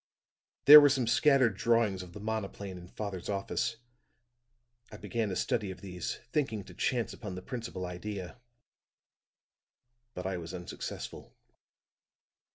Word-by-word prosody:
"There 150 +1 +13
were 145 - +6
some 130 -3 +1
scattered 130 -2 +4
drawings 115 -3 +2
of 90 -1 -11
the 105 - -8
monoplane 100 -3 -4
in 90 - -12
father's 95 -2 -6
office; 100 +3 -1 1.2
I - - -9
began 115 -3 -2
a 95 - -3
study 105 +1 -1
of 95 - -8
these, 90 -3 -4 0.2
thinking 115 -9 -1
to - - -13
chance 120 -3 -1
upon 100 -4 -7
the 90 - -7
principal 115 -7 -5
idea. 95 +4 -6 1.7
But 90 - -5
I 95 -1 -1
was 85 +1 -7
unsuccessful. 90 -1 -7
100 Hz, 135 wpm, -31 LUFS, 90-115 Hz, 1.7 s, There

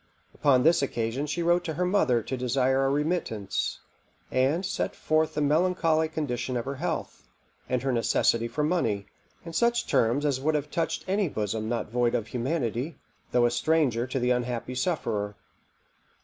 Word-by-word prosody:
Upon 130 -3 +3
this 165 0 +5
occasion 125 +1 -2
she 170 +4 -2
wrote 175 +1 +3
to 160 -3 -3
her 180 - 0
mother 130 - +2
to 130 - -3
desire 130 +2 +1
a - - +2
remittance, 145 - -1 0.5
and 140 +8 +2
set 195 - -2
forth 155 0 +1
the 150 - 0
melancholy 160 +1 +2
condition 130 -5 -2
of 120 - -3
her 135 0 -4
health, 165 +2 -4 0.4
and 125 0 0
her 135 - +1
necessity 115 0 +2
for 145 +6 -2
money, 115 - 0 0.4
in 165 - -7
such 235 +5 +2
terms 120 +6 +2
as 135 -3 0
would 155 +2 +1
have 150 0 -2
touched 165 -1 -2
any 195 -1 +1
bosom 110 -1 -2
not 115 -2 -2
void 120 0 +1
of 115 -3 -1
humanity, 130 +2 -2 0.3
though 120 -1 +4
a 120 - +2
stranger 125 -2 +1
to 130 +1 -2
the 125 0 +1
unhappy 125 0 -1
sufferer. 115 - -1
135 Hz, 170 wpm, -27 LUFS, 120-160 Hz, 0.5 s, this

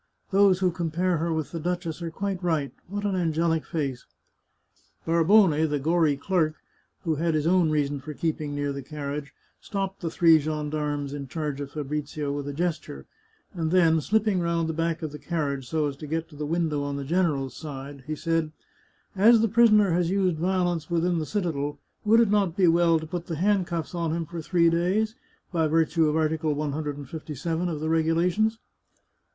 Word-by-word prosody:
Those 195 -1 +4
who 185 -1 +3
compare 170 +1 0
her 165 +2 -1
with 160 -2 -2
the 165 - -4
duchess 175 0 -3
are 170 - -3
quite 195 +2 -3
right. 160 -6 0 0.2
What 205 +2 -4
an 200 - 0
an 175 -3 +1
gelic 165 0 +1
face! 135 -6 -3 0.5
" - - -39
Barbone, 170 +4 +5 0.2
the 145 - 0
gory 155 0 +2
clerk, 155 0 0 0.5
who 160 -3 0
had 165 +1 +1
his 155 -1 0
own 175 -1 +3
reasons 145 -2 0
for 150 +3 -8
keeping 155 -2 -2
near 145 -1 -1
the 140 - -5
carriage, 140 0 -5 0.3
stopped 195 -2 -4
the 170 - -2
three 165 -1 +5
gendarmes 150 -1 -2
in 140 -1 -5
charge 150 0 -3
of 140 - -5
Fabrizio 150 0 -3
with 145 0 -4
a - - -2
gesture, 155 - -3 0.5
and 165 -3 -2
then, 165 -2 +4
slipping 210 +1 +1
round 170 -1 0
the 160 - -2
back 165 0 -1
of 155 - -3
the 150 - -8
carriage 140 -6 -3
so 155 -2 +1
as 145 -1 -2
to 150 - -8
get 160 +2 -2
to 150 - -14
the 150 0 -4
window 160 -2 0
on 145 0 -3
the 140 - -4
general's 150 -5 0
side, 140 -2 -8
he 155 - -2
said: 165 0 -1 0.3
" - - -36 0.3
As 220 +4 +6
the 225 - +3
prisoner 215 -3 +5
has 170 0 +1
used 185 -3 +1
violence 175 -2 0
within 170 0 +1
the 155 - -3
citadel, 150 -8 -2 0.3
would 220 +2 +5
it 220 -3 +2
not 195 -5 +1
be 185 -3 +4
well 170 0 +4
to 160 - -5
put 170 +2 -5
the 165 - -3
handcuflfs 180 -2 0
on 165 -2 -1
him 165 0 -2
for 170 +1 -6
three 170 +1 +2
days, 190 +6 +1 0.4
by 165 -3 +1
virtue 160 0 +2
of 150 - -1
Article 155 -1 0
157 150 +3 -3
of 155 -3 -3
the 155 - -3
regulations 170 +7 +2
165 Hz, 195 wpm, -26 LUFS, 150-175 Hz, 0.5 s, As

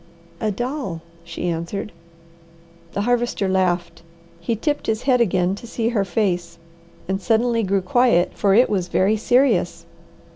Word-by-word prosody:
"A 215 - 0
doll," 240 - -4 0.2
she 170 +1 -5
answered. 175 +5 -3 1.0
The 200 - -1
Harvester 240 -3 0
laughed. 185 -3 0 0.4
He 170 +7 -2
tipped 290 +7 -2
his 220 0 -1
head 255 -2 +3
again 185 -4 +2
to 205 +4 -8
see 230 0 -1
her 220 -4 +1
face 180 -5 -1 0.5
and 190 +1 -2
suddenly 230 +3 +2
grew 195 -2 0
quiet, 235 -3 +3
for 195 -2 +2
it 245 +3 +6
was 185 -4 -1
very 195 +4 +2
serious. 225 -5 +1
205 Hz, 145 wpm, -21 LUFS, 185-235 Hz, 1.0 s, it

